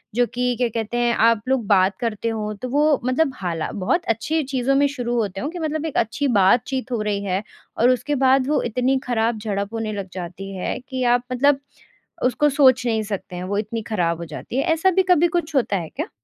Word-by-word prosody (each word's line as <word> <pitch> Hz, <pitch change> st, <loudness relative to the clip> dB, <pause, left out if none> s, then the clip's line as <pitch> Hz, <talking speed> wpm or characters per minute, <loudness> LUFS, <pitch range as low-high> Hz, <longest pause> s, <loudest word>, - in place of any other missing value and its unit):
जो 245 Hz, -, +4 dB
कि 250 Hz, 0 st, 0 dB
क्या 245 Hz, -, +2 dB
कहते 230 Hz, +1 st, -2 dB
हैं 240 Hz, -1 st, +2 dB
आप 230 Hz, -1 st, +3 dB
लोग 260 Hz, -4 st, +1 dB
बात 190 Hz, -1 st, +3 dB
करते 230 Hz, -1 st, -2 dB
हो 215 Hz, -1 st, -3 dB
तो 255 Hz, -, -4 dB
वो 295 Hz, +2 st, +3 dB
मतलब 270 Hz, +3 st, +2 dB
हाला 170 Hz, -6 st, -3 dB
बहुत 215 Hz, -, -1 dB
अच्छी 300 Hz, +9 st, 0 dB
चीज़ों 265 Hz, 0 st, 0 dB
में 285 Hz, +1 st, +4 dB
शुरू 245 Hz, -4 st, -3 dB
होते 195 Hz, -3 st, -2 dB
हैं 285 Hz, -, -2 dB
कि 350 Hz, +1 st, -7 dB
मतलब 315 Hz, 0 st, -2 dB
एक 315 Hz, -, -3 dB
अच्छी 255 Hz, +6 st, 0 dB
बातचीत 245 Hz, +5 st, +2 dB
हो 235 Hz, -3 st, -1 dB
रही 205 Hz, -1 st, -1 dB
है। 190 Hz, +1 st, -1 dB, 0.3 s
और 240 Hz, +2 st, +4 dB
उसके 285 Hz, +3 st, +1 dB
बाद 265 Hz, 0 st, +3 dB
वो 300 Hz, -, +2 dB
इतनी 250 Hz, +3 st, +1 dB
ख़राब 230 Hz, -2 st, 0 dB
झड़प 200 Hz, 0 st, -3 dB
होने 225 Hz, -1 st, -2 dB
लग 195 Hz, -2 st, -5 dB
जाती 185 Hz, +2 st, -7 dB
है 185 Hz, -, -3 dB
कि 260 Hz, -1 st, -2 dB
आप 245 Hz, -, -2 dB
मतलब 275 Hz, +2 st, +3 dB, 0.6 s
उसको 275 Hz, +4 st, +2 dB
सोच 260 Hz, -3 st, +4 dB
नहीं 220 Hz, -2 st, +1 dB
सकते 200 Hz, -3 st, -5 dB
हैं 180 Hz, -, -5 dB
वो 200 Hz, +2 st, -2 dB
इतनी 220 Hz, +1 st, -3 dB
ख़राब 175 Hz, -7 st, -1 dB
हो 170 Hz, -, -5 dB
जाती 160 Hz, -, -7 dB
है। 275 Hz, -, +2 dB
ऐसा 330 Hz, +4 st, +3 dB
भी 380 Hz, +1 st, +3 dB
कभी 345 Hz, 0 st, +5 dB
कुछ 325 Hz, -2 st, -2 dB
होता 235 Hz, -7 st, +2 dB
है 170 Hz, -3 st, -4 dB
क्या? -, -, -3 dB
240 Hz, 225 wpm, -22 LUFS, 205-270 Hz, 0.6 s, कभी